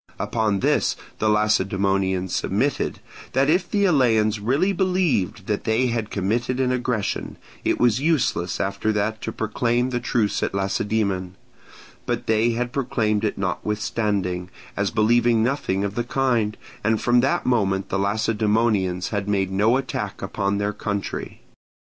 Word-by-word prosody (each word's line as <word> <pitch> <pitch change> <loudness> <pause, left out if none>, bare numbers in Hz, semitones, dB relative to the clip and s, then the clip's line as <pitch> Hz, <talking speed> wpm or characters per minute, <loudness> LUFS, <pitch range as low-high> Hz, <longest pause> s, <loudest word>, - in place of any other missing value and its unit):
Upon 105 -1 0
this - - +2 0.2
the 110 - +2
Lacedaemonians 95 -3 +1
submitted, - - -1 0.3
that 135 +3 +3
if 180 +1 +1
the 200 -1 +2
Eleans 115 - +3
really 140 - +1
believed 175 - 0
that 105 0 -2
they 115 +3 +2
had 115 -2 -2
committed 115 +6 -1
an 130 -1 +2
aggression, 125 -4 -2 0.3
it - - +1
was 120 -1 +3
useless 140 - 0
after 100 +3 0
that 105 +1 -1
to 110 - -3
proclaim 120 +3 0
the 120 - 0
truce 115 -3 0
at - - -1
Lacedaemon; 100 -1 -1 0.7
but - - -2
they 115 +1 +2
had 120 +2 -2
proclaimed 110 -6 0
it 105 - -1
notwithstanding, 100 -2 -2 0.3
as 100 0 0
believing 115 +1 +3
nothing 115 -7 0
of 100 -1 -2
the 120 - -1
kind, 120 -4 0 0.3
and 110 0 +2
from 120 0 +3
that 135 +3 +1
moment 100 -6 +1
the 100 - -1
Lacedaemonians 105 -2 +1
had 100 -1 -2
made 95 -2 0
no 105 +6 +3
attack 135 -1 -4
upon 100 +1 -1
their 105 +1 -1
country. 100 -2 -4
110 Hz, 145 wpm, -23 LUFS, 100-120 Hz, 0.7 s, that